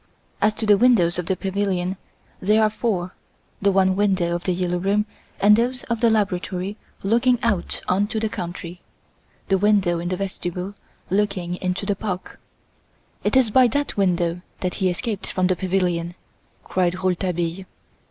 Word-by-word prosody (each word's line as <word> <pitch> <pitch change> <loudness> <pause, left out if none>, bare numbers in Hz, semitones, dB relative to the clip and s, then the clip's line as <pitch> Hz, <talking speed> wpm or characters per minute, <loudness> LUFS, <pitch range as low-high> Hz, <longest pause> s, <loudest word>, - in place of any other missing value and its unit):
As 215 0 +3
to 220 - -3
the 205 -2 +5
windows 185 -9 +4
of 180 - -4
the 190 - +1
pavilion, 190 -1 -1 0.5
there 215 +3 +4
are 215 - +3
four; 190 -6 -2 0.5
the 200 0 +4
one 190 -1 +3
window 190 -4 +1
of 175 0 -3
The 185 - +2
"Yellow 180 0 -1
Room" 200 +3 +1 0.3
and 210 +1 +7
those 245 +3 0
of 230 - 0
the 235 - +5
laboratory 195 -2 -1 0.3
looking 235 +5 +3
out 210 -7 0
on 195 +3 +2
to 220 - -2
the 220 - 0
country; 175 -2 -6 0.7
the 195 -1 +3
window 195 -4 +3
in 175 +1 -3
the 185 - -1
vestibule 185 0 -4 0.4
looking 195 -3 0
into 185 +2 -2
the 200 0 0
park." 190 -2 -5 0.8
"It - - +1
is 245 -5 +3
by 255 +2 +6
that 285 +5 -1
window 175 -3 +1 0.2
that 180 -1 -1
he 185 - +3
escaped 205 +2 -3
from 185 - +1
the 185 0 +2
pavilion!" 175 -2 -1 0.5
cried 180 -1 0
Rouletabille. 180 -1 -1
190 Hz, 165 wpm, -23 LUFS, 180-210 Hz, 0.8 s, and